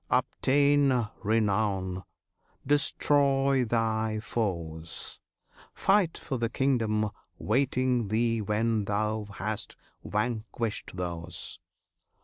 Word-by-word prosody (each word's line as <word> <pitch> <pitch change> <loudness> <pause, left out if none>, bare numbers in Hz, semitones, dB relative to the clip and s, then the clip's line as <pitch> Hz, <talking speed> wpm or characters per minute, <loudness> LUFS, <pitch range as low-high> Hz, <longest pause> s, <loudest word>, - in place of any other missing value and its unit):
obtain 140 -3 +3
renown! 100 -3 +1 0.6
destroy 140 -1 +3
thy 110 -1 0
foes! 85 -8 -3 0.6
Fight 195 -4 +3
for 130 -4 -4
the 115 -1 0
kingdom 110 -5 +1 0.3
waiting 125 0 +1
thee 115 +2 +1
when 105 +1 +1
thou 105 +1 -1
hast 110 +2 -4 0.3
vanquished 110 0 -2
those. 85 -2 -4
110 Hz, 80 wpm, -29 LUFS, 105-130 Hz, 0.6 s, obtain